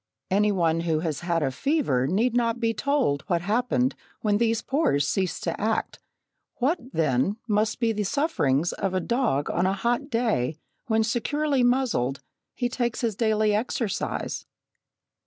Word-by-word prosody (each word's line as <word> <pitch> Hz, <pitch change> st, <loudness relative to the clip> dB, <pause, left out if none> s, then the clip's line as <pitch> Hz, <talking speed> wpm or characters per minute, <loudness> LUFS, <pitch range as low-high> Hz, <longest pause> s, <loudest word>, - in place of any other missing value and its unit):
Any 205 Hz, +2 st, +3 dB
one 165 Hz, -4 st, +1 dB
who 165 Hz, -2 st, 0 dB
has 160 Hz, -4 st, -2 dB
had 170 Hz, -2 st, 0 dB
a 135 Hz, -, 0 dB
fever 250 Hz, -, +1 dB
need 225 Hz, -, +1 dB
not 235 Hz, -1 st, +1 dB
be 230 Hz, -1 st, +1 dB
told 270 Hz, -, +1 dB
what 175 Hz, -4 st, +1 dB
happened 250 Hz, +6 st, +1 dB, 0.3 s
when 205 Hz, -1 st, +2 dB
these 230 Hz, -1 st, +1 dB
pores 265 Hz, -, +1 dB
ceased 190 Hz, +1 st, -1 dB
to 165 Hz, -, -3 dB
act; 220 Hz, +1 st, -1 dB, 0.6 s
what, 285 Hz, +8 st, +1 dB
then, 155 Hz, -, +1 dB
must 215 Hz, +1 st, +1 dB
be 230 Hz, -2 st, +2 dB
the 215 Hz, -1 st, -2 dB
sufferings 190 Hz, -, +1 dB
of 195 Hz, -1 st, -2 dB
a -, -, +2 dB
dog 225 Hz, -, 0 dB
on 180 Hz, +2 st, +1 dB
a 190 Hz, -, +1 dB
hot 235 Hz, +8 st, -1 dB
day, 220 Hz, -, 0 dB, 0.3 s
when, 220 Hz, -1 st, +2 dB
securely 275 Hz, +5 st, 0 dB
muzzled, 245 Hz, -, +1 dB, 0.4 s
he 245 Hz, -, 0 dB
takes 240 Hz, -1 st, -2 dB
his 230 Hz, -4 st, 0 dB
daily 215 Hz, -1 st, +2 dB
exercise? 220 Hz, 0 st, -2 dB
215 Hz, 155 wpm, -26 LUFS, 170-245 Hz, 0.6 s, Any